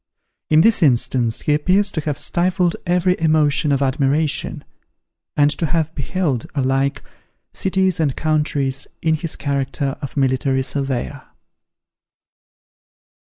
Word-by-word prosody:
In 155 0 +5
this 225 +1 +4
instance, 120 -4 +2
he 150 - +1
appears 185 +7 +2
to 155 - -2
have 150 -2 -3
stifled 180 0 0
every 180 +1 +2
emotion 155 -2 +2
of 140 0 +1
admiration, 140 +3 0 0.7
and 145 0 +4
to 165 +2 -1
have 160 0 -1
beheld, 145 -4 -2
alike, 135 0 0 0.5
cities 190 -2 0
and 145 -5 +1
countries 150 -4 -1 0.2
in 160 -1 +2
his 160 +1 -2
character 140 -1 -2
of 140 0 -7
military 130 0 +1
surveyor. 135 0 -3
150 Hz, 115 wpm, -20 LUFS, 135-165 Hz, 0.7 s, In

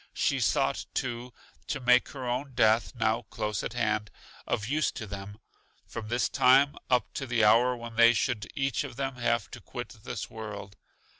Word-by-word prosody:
She - - +1
sought, - - +1
too, 120 0 -3 0.4
to 140 - -2
make 125 -1 +4
her 130 -3 -6
own 130 +3 -2
death, 110 +1 +3
now 115 0 +1
close 105 -2 -2
at - - -4
hand, 110 -3 0 0.4
of 105 - -1
use 150 +3 +1
to 110 - -6
them, 100 0 -7 0.5
from 110 -2 -7
this 120 +2 +1
time 135 +3 +5
up 125 -3 +2
to 135 - -4
the 120 -2 +2
hour 120 +4 +5
when 115 -1 -9
they 115 0 +7
should 120 -2 -1
each 135 -2 0
of - - -8
them 135 0 -3
have 115 -5 0
to - - -9
quit - - -7
this - - -5
world. 100 -3 -8
120 Hz, 180 wpm, -29 LUFS, 110-125 Hz, 0.5 s, they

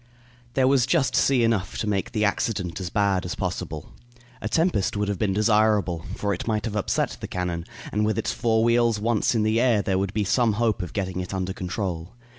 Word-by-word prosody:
There 130 -1 +4
was 130 -2 +3
just 150 -4 +2
sea 130 -3 +3
enough 110 -5 0
to - - -2
make 105 +2 -1
the 105 -3 +1
accident 100 -4 -1
as 90 - -3
bad 100 -2 +1
as 90 - -4
possible. 90 -5 -4 0.5
A - - -3
tempest 160 - +1
would 105 0 0
have 100 -2 -2
been 105 -3 +1
desirable, 105 -4 +2
for 100 -1 -1
it 90 - -5
might 110 0 0
have 110 -2 -3
upset 105 - -1
the - - -4
cannon, 90 -2 -3 0.3
and 105 +1 0
with 105 -1 0
its - - -1
four 110 -1 +1
wheels 115 -2 +3
once 115 +1 +1
in 110 - +2
the 110 +2 +2
air 115 -5 +3
there 95 -1 0
would 100 +1 -2
be 105 - +1
some 115 +3 +2
hope 110 -2 0
of 90 -3 -6
getting 95 -2 -2
it 90 +1 -4
under 95 0 -2
control. 90 -2 -4
105 Hz, 220 wpm, -25 LUFS, 95-115 Hz, 0.5 s, There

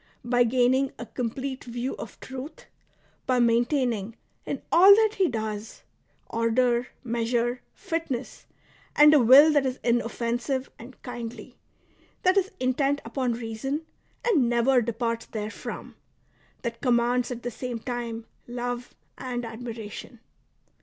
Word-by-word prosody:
By 245 0 +3
gaining 255 +3 +2
a 240 - -6
complete 260 +3 -4
view 245 +2 -4
of - - -9
truth, 265 +4 -8 0.6
by 255 -1 +2
maintaining, 235 -2 +1 0.3
in - - -4
all 385 +4 +9
that 435 0 +3
he 375 - +5
does, 215 -2 -5 0.4
order, 235 +2 +1 0.2
measure, 240 +1 -1
fitness, 325 -7 -4 0.5
and 300 +1 +8
a 300 - +7
will 270 +6 +8
that 290 -2 +4
is 260 -1 -2
inoffensive 240 +2 -1
and 245 +3 -12
kindly, 240 -2 -7 0.7
that 370 +1 +4
is 390 -1 +2
intent 275 +3 +1
upon 245 +1 -1
reason 240 +7 -4 0.4
and 295 - +3
never 240 +2 +3
departs 230 0 -2
therefrom, 215 -1 -6 0.7
that 235 -1 -4
commands 245 0 +2
at 240 -2 -6
the 245 - -3
same 250 0 -4
time 230 -1 -5 0.2
love 245 0 -4 0.2
and 245 -2 -4
admiration. 225 0 -8
245 Hz, 125 wpm, -26 LUFS, 235-265 Hz, 0.7 s, all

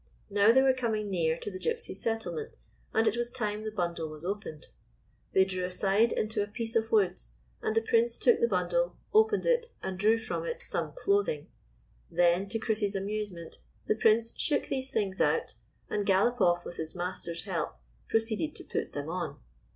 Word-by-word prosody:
Now 205 +2 +6
they 265 +3 +5
were 265 -1 +5
coming 220 -5 -1
near 165 -3 +1
to 205 - -6
the 185 - -6
Gypsies' 470 - -2
settlement, 230 - -3 0.3
and 225 0 +2
it 220 - +3
was 240 0 -1
time 215 -4 -3
the 220 - -2
bundle 170 -6 -2
was 155 +2 -9
opened. 190 -6 -5 0.6
They 190 - +6
drew 185 -1 -3
aside 195 +5 +2
into 215 -1 0
a 205 - -1
piece 225 +1 -5
of 225 0 +1
woods, 180 - +1 0.3
and 220 - -1
the 225 - +3
Prince 230 +1 +2
took 480 - +4
the 470 - +4
bundle, - - 0 0.2
opened 435 0 +4
it 485 -1 +2 0.2
and 190 -1 -4
drew 215 +3 +4
from 225 - -3
it 485 -1 -4
some - - -3
clothing. 430 0 0 0.6
Then, 175 +3 +3
to 225 - -1
Chris's 215 -2 -1
amusement, 195 -4 -4 0.3
the - - +3
Prince 225 +1 +3
shook 295 -3 0
these 265 0 -2
things 200 -5 -1
out, - - +2 0.3
and 205 - -1
Galopoff, 195 -3 +3
with 175 - -7
his 160 +1 -5
master's 175 -1 -4
help, 175 -6 -3 0.3
proceeded 225 +7 0
to - - -7
put - - -3
them 145 0 -4
on. 175 +2 -4
215 Hz, 180 wpm, -30 LUFS, 185-235 Hz, 0.6 s, Now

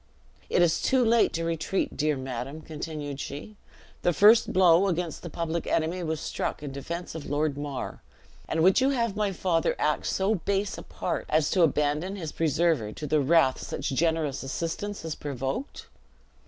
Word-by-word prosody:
"It 175 - +4
is 165 -1 +2
too 260 -2 +3
late 230 0 +4
to 165 - -2
retreat, 165 +3 -1
dear 150 -1 +1
madam," 130 +3 -5
continued 150 -2 -6
she; 180 +11 -7 0.5
"the 175 - +2
first 215 +8 +6
blow 185 0 +5
against 175 -3 -2
the 175 - -7
public 165 +1 -3
enemy 165 +3 0
was 160 -2 -2
struck - - -3
in 145 - -5
defense 170 +6 -5
of 160 -3 -7
Lord 145 0 0
Mar; 145 -2 -5 0.5
and 160 - +1
would 190 +7 +5
you 265 - +4
have 235 -6 0
my 210 -1 0
father 170 -3 0
act 150 - 0
so 195 +3 +1
base 200 +1 -1
a - - -7
part, - - -4
as 155 -1 +2
to 185 - +3
abandon 150 +4 +1
his 165 -6 -5
preserver 160 -7 +1
to 150 - -7
the 150 0 +2
wrath 140 -2 +3
such - - -4
generous 155 -1 0
assistance 165 +9 -4
has 160 -1 -3
provoked?" 140 - -4
165 Hz, 175 wpm, -27 LUFS, 150-185 Hz, 0.5 s, first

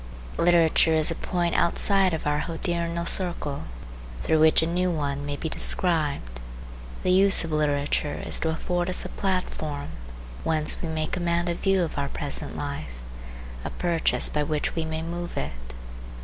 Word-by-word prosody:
Literature 165 -1 +4
is 155 +1 0
a - - -2
point 175 -1 -2
outside 195 +2 +2
of 160 - -4
our 150 0 +1
hodiernal 170 +1 -3
circle 170 -6 0 0.5
through 160 - +1
which 160 +1 +5
a - - +1
new 180 +2 0
one 145 -3 -3
may 145 - -3
be 160 - -4
described. 150 - +2 0.6
The 185 - +2
use 195 0 +8
of 165 - -5
literature 145 -1 0
is - - +1
to 160 - -1
afford 175 +2 -2
us 180 - -1
a - - -5
platform 155 -6 -3 0.5
whence 155 -1 +1
we 170 - -4
may 155 -1 -2
command 175 0 -1
a - - +1
view 195 +1 +1
of 160 -3 -4
our 140 0 -2
present 145 0 -4
life, 75 - -6 0.6
a - - -4
purchase 170 -2 0
by 150 - -1
which 150 0 -2
we 165 -1 -2
may 160 0 -4
move 175 +1 -6
it. 70 0 -3
160 Hz, 165 wpm, -25 LUFS, 150-175 Hz, 0.6 s, use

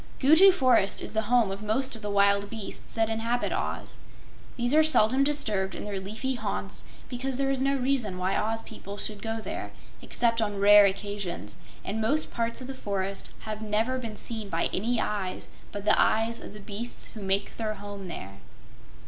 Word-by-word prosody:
Gugu 320 +8 +8
Forest 255 - +3
is - - -5
the 220 0 -1
home 240 -5 +4
of 195 +1 -5
most 235 +5 0
of 225 - -8
the 210 - -4
wild 200 0 +3
beasts 220 -3 -6
that 225 -1 +2
inhabit 230 +2 -1
Oz. - - -3 0.6
These 245 +2 0
are 310 +1 +7
seldom 265 -4 +4
disturbed 215 -10 +1
in - - -5
their 205 -2 -3
leafy 220 +7 -3
haunts 245 - -4 0.2
because 255 +1 -2
there 270 0 +1
is 265 -1 0
no 275 +1 +2
reason 250 -7 0
why 185 +1 0
Oz 225 +1 -1
people 200 -2 -9
should 210 0 -3
go 225 0 -3
there, 220 - -5 0.3
except 230 -1 +1
on 205 -2 -1
rare 205 0 +8
occasions, 200 -4 -4 0.3
and 220 +3 -2
most 290 +8 +1
parts 235 +1 -1
of - - -5
the 270 - -5
forest 195 -5 -3
have 215 -1 -5
never 220 +4 0
been 225 -4 -6
seen 220 -2 -5
by 165 -2 0
any 230 +4 0
eyes 195 -4 -3 0.2
but 205 0 -6
the 215 - +5
eyes 225 +1 +2
of - - -9
the - - -9
beasts 210 +4 -4
who 220 - -8
make 195 +1 -1
their 215 -2 -2
home 200 -1 -8
there. 95 - -8
220 Hz, 190 wpm, -28 LUFS, 200-245 Hz, 0.6 s, Gugu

